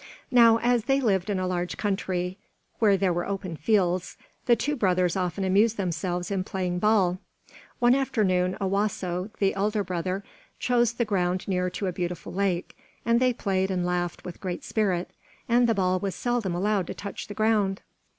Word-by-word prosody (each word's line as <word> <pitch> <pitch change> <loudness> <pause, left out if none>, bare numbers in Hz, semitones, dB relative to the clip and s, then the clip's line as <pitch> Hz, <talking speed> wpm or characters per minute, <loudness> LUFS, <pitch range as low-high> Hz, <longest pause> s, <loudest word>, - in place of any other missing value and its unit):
Now 230 -3 +7
as 240 -1 +1
they 270 +1 +3
lived 195 -7 +1
in 200 - 0
a 185 - -1
large 180 -1 -2
country, 190 -2 -2 0.4
where 205 -3 +4
there 185 -2 +1
were 175 +1 -2
open 195 -4 -4
fields, 180 0 +1 0.3
the 240 - +6
two 295 +6 -1
brothers 185 -7 +1
often 185 0 -1
amused 205 +4 +3
themselves 180 0 -2
in 190 -2 0
playing 180 -2 -2
ball. 190 -3 +3 0.6
One 240 0 +4
afternoon 205 -9 +1
Owasso, 195 -1 -1
the 195 -1 +2
elder 205 +1 0
brother, 185 +2 -3 0.3
chose 240 -2 +2
the 235 0 0
ground 185 -3 0
near 180 -2 0
to 190 +2 -4
a 185 - -1
beautiful 175 -1 -4
lake, 185 -2 -1 0.3
and 235 +1 +3
they 255 0 +3
played 190 -4 -1
and 180 -2 -1
laughed 175 -1 -2
with 180 -2 -8
great 180 -2 -4
spirit, 190 -5 -1 0.4
and 240 +1 +4
the 225 - +3
ball 185 -1 +1
was 195 -1 -3
seldom 240 -7 -1
allowed 195 0 0
to - - -5
touch 200 - -6
the 205 - -8
ground. 215 -3 +1
195 Hz, 180 wpm, -26 LUFS, 180-215 Hz, 0.6 s, Now